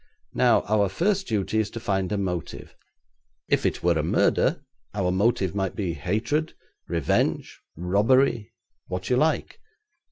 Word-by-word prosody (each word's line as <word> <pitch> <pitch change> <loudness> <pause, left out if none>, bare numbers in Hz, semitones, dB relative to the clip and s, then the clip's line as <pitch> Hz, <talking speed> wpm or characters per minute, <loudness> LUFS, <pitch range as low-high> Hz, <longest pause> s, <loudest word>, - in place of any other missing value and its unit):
Now - - +4
our 105 -2 +1
first 190 - 0
duty 110 -1 0
is 105 -2 0
to 115 - -7
find 95 -3 -1
a 105 - 0
motive. 90 -5 -4 0.7
If - - +2
it - - -3
were 85 -2 +3
a - - +2
murder, 75 - +1 0.3
our 95 -3 0
motive 100 -1 +1
might 95 -2 -2
be 95 -6 -2
hatred, 110 - -1 0.3
revenge, 85 -5 -1 0.2
robbery 105 - +2 0.4
what 90 +4 -4
you 125 - +4
like. 155 +4 0
100 Hz, 140 wpm, -25 LUFS, 90-115 Hz, 0.7 s, Now